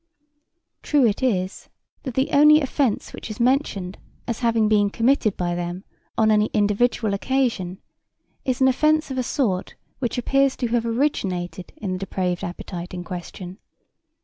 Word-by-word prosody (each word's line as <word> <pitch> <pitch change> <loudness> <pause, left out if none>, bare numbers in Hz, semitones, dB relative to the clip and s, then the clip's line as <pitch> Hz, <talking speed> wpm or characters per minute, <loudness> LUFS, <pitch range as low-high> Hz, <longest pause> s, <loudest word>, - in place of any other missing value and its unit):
True 290 -4 +3
it 215 +1 +1
is 190 -7 -1 0.3
that 260 -4 -6
the 265 - +1
only 300 +2 +7
offence 270 -5 -1
which - - -8
is 215 - -7
mentioned 235 -7 0 0.3
as 235 - -2
having 230 -3 +2
been 205 -1 +3
committed 230 -1 +1
by 175 -1 -1
them 175 +2 -4 0.3
on 220 -1 +4
any 210 0 +3
individual 210 +1 +2
occasion 210 -5 -1 0.7
is 260 0 -1
an 265 - +6
offence 305 +3 +2
of 260 - -2
a - - +2
sort 235 -8 -1 0.2
which 250 -1 -2
appears 275 +2 +2
to 245 - -2
have 235 0 0
originated 190 -9 -2
in 195 -3 -3
the 185 - -3
depraved 180 -2 -2
appetite 175 0 -6
in 175 - -5
question. 180 +2 -8
220 Hz, 155 wpm, -23 LUFS, 185-260 Hz, 0.7 s, only